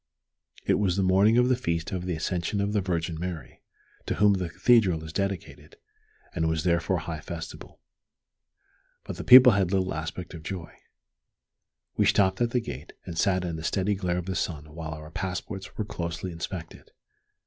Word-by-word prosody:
It - - +2
was 95 -3 +1
the 95 - +2
morning 100 +5 +4
of 125 0 +5
the 130 - +3
Feast 85 -7 -2
of 90 -2 -3
the 90 - -1
Ascension 85 +4 -2
of 100 +1 0
the 105 - +2
Virgin 85 -3 -2
Mary, 85 -3 -6 0.5
to - - 0
whom 105 0 +5
the 90 -3 -2
Cathedral 95 -8 +3
is 80 0 -8
dedicated, 100 -1 -4 0.6
and 80 -2 0
was 80 -1 -1
therefore 85 +1 +1
high 80 -1 -5
festival. 80 +1 -8 1.2
But - - -7
the - - -5
people 125 0 +10
had 95 -3 +1
little 95 -1 +1
aspect 80 +3 -5
of 85 - -8
joy. 85 +1 -6 1.2
We - - +4
stopped 95 +1 +3
at 120 - +3
the 125 - +1
gate, 80 - -8
and 85 - -6
sat 90 +1 +1
in 85 -2 -3
the 80 - -7
steady 95 +4 0
glare 90 -3 -1
of 90 - -3
the 95 - -3
sun 75 -3 -3
while 80 0 -5
our 75 0 -10
passports 95 +2 -5
were 110 - -1
closely 85 -1 -4
inspected. 85 0 -7
90 Hz, 180 wpm, -27 LUFS, 80-100 Hz, 1.2 s, people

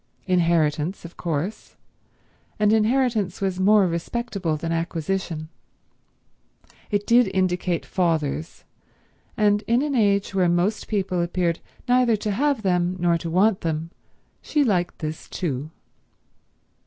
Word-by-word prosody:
Inheritance, 170 -2 +1
of 170 - -10
course; 170 +4 -4 0.8
and 210 0 +3
inheritance 220 -4 +1
was 190 -2 -1
more 205 +1 +5
respectable 180 -1 -2
than 165 +2 -4
acquisition. 165 0 -2 1.4
It 205 0 0
did 235 -2 +4
indicate 180 -2 0
fathers; 160 -3 -1 0.7
and 205 -1 +3
in 240 +4 +3
an 295 -1 -1
age 200 -5 +2
where 185 -2 +2
most 175 +5 0
people 190 -4 -1
appeared 170 -1 0 0.3
neither 245 -2 +4
to 210 0 -3
have 275 +2 0
them 180 -1 +1
nor 175 -1 +2
to 165 - -5
want 190 +4 +3
them 165 0 -3 0.5
she 295 - +1
liked 180 -8 0
this 155 -1 -6
too. 145 -4 -3
185 Hz, 120 wpm, -23 LUFS, 170-210 Hz, 1.4 s, more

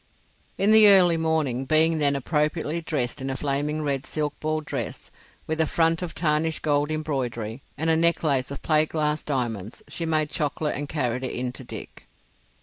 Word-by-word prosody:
In 200 +2 +3
the 220 -1 +9
early 185 -4 +6
morning, 160 -6 0
being 160 +2 +3
then 140 -1 +2
appropriately 150 +3 -1
dressed 135 -7 -3
in 135 - -3
a 135 - -2
flaming 145 +2 -1
red 140 -2 -1
silk 150 -2 -2
ball 155 0 -1
dress, 140 -6 -6 0.3
with 160 +1 -1
a 160 - +2
front 165 +1 +2
of 175 -2 -5
tarnished 155 0 0
gold 145 -1 +1
embroidery 130 -7 -3 0.2
and 160 - -2
a 160 - +4
necklace 160 -5 +2
of 140 - -7
plate 155 -1 +3
glass 150 -1 0
diamonds, 120 -7 -3
she 165 - -3
made 155 -2 +1
chocolate 150 -1 -1
and 145 0 -4
carried 130 -4 -2
it 130 - -3
in 125 0 -2
to 130 - -9
Dick. - - -10
150 Hz, 180 wpm, -25 LUFS, 135-160 Hz, 0.3 s, the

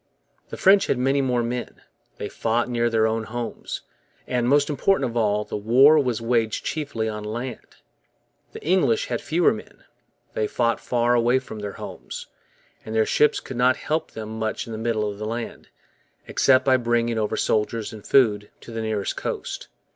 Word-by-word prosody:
The - - -7
French 195 +1 +5
had - - +1
many 135 +2 +2
more 125 -3 +1
men, 120 +1 -5 0.3
they - - -4
fought 115 +1 0
near 120 -1 +1
their 110 -1 +2
own 110 0 0
homes, 120 +1 -5 0.4
and, 125 -1 0
most 145 +1 +4
important 150 0 +1
of 120 - -7
all, 105 -2 +2
the - - -5
war 130 +9 +6
was 125 -6 0
waged 115 -1 0
chiefly 140 -8 -2
on 105 -1 -4
land. 120 +3 -6 0.8
The - - -10
English 155 -9 +2
had 120 -2 -2
fewer 165 0 +2
men, 110 - -11 0.5
they 110 - 0
fought 115 0 0
far 120 0 +1
away 120 +1 +3
from 125 -4 -6
their 105 -1 -5
homes, - - -8 0.6
and 110 - -6
their 110 -1 +4
ships 150 - +3
could 130 - -8
not 130 +2 +4
help 155 +2 -2
them 110 0 -7
much 110 -1 -2
in 115 - -9
the 110 - -5
middle 110 -2 0
of 100 -1 -6
the 105 - -3
land, 115 +1 -5 0.6
except 130 -1 +4
by 130 -1 +5
bringing 120 -1 0
over 105 -1 -1
soldiers 110 +1 0
and 105 -2 -10
food 105 -6 +3
to - - -11
the 115 0 -4
nearest 110 -3 -2
coast. - - -4
120 Hz, 185 wpm, -24 LUFS, 110-130 Hz, 0.8 s, war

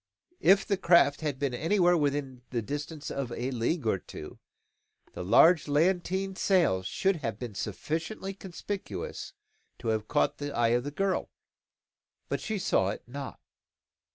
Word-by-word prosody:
If 195 +2 +5
the 200 - 0
craft 170 -5 +4
had 150 -4 -2
been 140 -2 -1
anywhere 175 +5 +3
within 140 -4 -1
the 120 -3 -2
distance 145 +4 -5
of 135 -3 -3
a 125 +2 -3
league 125 +4 -1
or 105 -4 +1
two, 75 - -10 0.7
the - - -5
large 155 - +6
lateen 185 +5 +1
sail 180 - +3
should 190 - 0
have 115 -9 -3
been 120 -2 -6
sufficiently 165 - -4
conspicuous 190 - -6 0.4
to 115 - -4
have 110 -1 0
caught 145 - +1
the 145 0 -4
eye 120 -1 +3
of 120 +2 +1
the - - -2
girl. 195 +6 -1 1.0
But - - -1
she 220 - -2
saw 95 - +2
it 100 - -5
not. 135 +2 -7
145 Hz, 155 wpm, -29 LUFS, 120-180 Hz, 1.0 s, large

